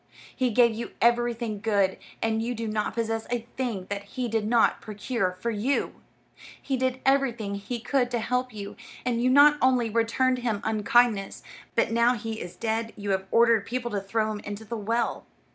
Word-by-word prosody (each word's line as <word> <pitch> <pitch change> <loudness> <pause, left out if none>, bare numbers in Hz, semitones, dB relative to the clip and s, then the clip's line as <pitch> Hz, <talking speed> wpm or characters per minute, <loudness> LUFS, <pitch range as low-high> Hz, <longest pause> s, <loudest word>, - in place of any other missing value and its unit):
He 255 -2 +1
gave 235 0 +4
you 230 +2 -6
everything 235 -2 +1
good, 200 -4 +1 0.2
and 225 0 +1
you 240 +2 -2
do 230 0 -4
not 215 -1 -2
possess 225 -1 -2
a 240 -1 -2
thing 235 -8 -2
that 200 0 -2
he 250 +4 -4
did 225 -2 -1
not 235 0 +3
procure 210 -3 -2
for 235 +4 -1
you. 230 +6 -1 0.6
He 270 - -2
did 260 0 -1
everything 250 -7 +1
he 200 +5 -4
could 245 +1 0
to 245 - -1
help 250 +2 -1
you, 205 -2 -7 0.3
and 240 -2 0
you 250 - +3
not 290 +3 +6
only 250 -3 +3
returned 235 +3 +1
him 230 -4 -1
unkindness, 215 -1 +2 0.3
but - - +2
now 235 +2 +3
he 225 -1 -5
is 175 - -7
dead 225 0 -2
you 205 -1 -3
have 190 0 -1
ordered 230 -2 +4
people 240 0 -3
to 200 -1 -1
throw 215 +2 -1
him 210 - -4
into 205 +2 -7
the 230 +2 -5
well. 230 +2 -1
230 Hz, 190 wpm, -26 LUFS, 215-245 Hz, 0.6 s, not